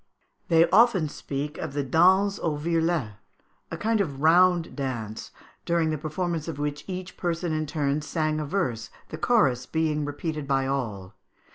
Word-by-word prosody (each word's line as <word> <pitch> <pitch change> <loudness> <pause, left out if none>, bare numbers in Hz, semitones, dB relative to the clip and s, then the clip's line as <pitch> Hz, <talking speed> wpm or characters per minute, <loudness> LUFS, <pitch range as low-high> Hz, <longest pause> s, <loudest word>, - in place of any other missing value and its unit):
They 165 0 +5
often 215 -9 +4
speak 145 +2 -5
of 140 - -5
the 145 0 -1
danse 190 +8 +3
au 155 -3 -1
virlet, 165 -8 0 0.5
a - - -5
kind 225 0 +1
of 140 -8 -3
round 175 +2 +4
dance, 120 -6 -4 0.3
during 170 -2 +1
the 155 - -1
performance 160 +1 -3
of 165 - -5
which 145 0 -3
each 185 -1 -6
person 170 -1 -2
in 155 0 -1
turn 145 -1 -1
sang 155 0 -1
a 155 - -2
verse, 125 - -2 0.2
the - - -7
chorus 135 - +2
being 155 -2 0
repeated 145 0 -4
by 135 -1 +1
all. 110 -9 -3
155 Hz, 160 wpm, -26 LUFS, 140-170 Hz, 0.5 s, They